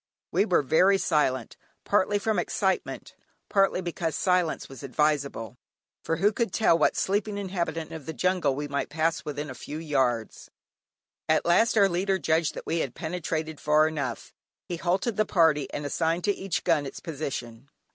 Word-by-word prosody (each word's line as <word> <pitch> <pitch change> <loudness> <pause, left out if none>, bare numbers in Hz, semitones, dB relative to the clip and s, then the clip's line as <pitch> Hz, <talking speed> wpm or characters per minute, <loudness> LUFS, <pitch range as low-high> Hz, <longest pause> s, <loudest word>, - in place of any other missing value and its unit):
We - - +3
were 180 -7 +2
very 185 +8 +4
silent, 145 -9 0 0.3
partly 205 0 +2
from 210 -1 0
excitement, 190 +2 -2 0.4
partly 195 -2 +2
because 170 -3 -3
silence 180 -3 +1
was 135 -3 -11
advisable; 140 -4 -1 0.5
for 165 - 0
who 200 +6 +3
could 230 -3 -1
tell 215 -5 +4
what 160 - +2
sleeping 205 +1 0
inhabitant 175 -5 -3
of 160 -4 -8
the 160 - -3
jungle 180 -7 +1
we 145 +1 -3
might 140 0 -2
pass 160 +2 0
within 145 0 -4
a 130 - -6
few 150 +3 -7
yards. 130 -8 -1 0.8
At 155 - +3
last 220 +7 +3
our 200 -2 +6
leader 190 +2 0
judged 160 -3 +1
that - - -7
we 165 +1 -1
had 130 -6 -3
penetrated 160 -2 -3
far 150 +1 +4
enough; 140 -7 -4 0.3
he 175 - -3
halted 190 +6 0
the 215 - +4
party, 160 -5 +3
and 145 - -4
assigned 165 +4 0
to 205 - +2
each 190 -2 -3
gun 155 -5 +2
its - - -8
position. 135 -6 -6
165 Hz, 170 wpm, -27 LUFS, 145-185 Hz, 0.8 s, our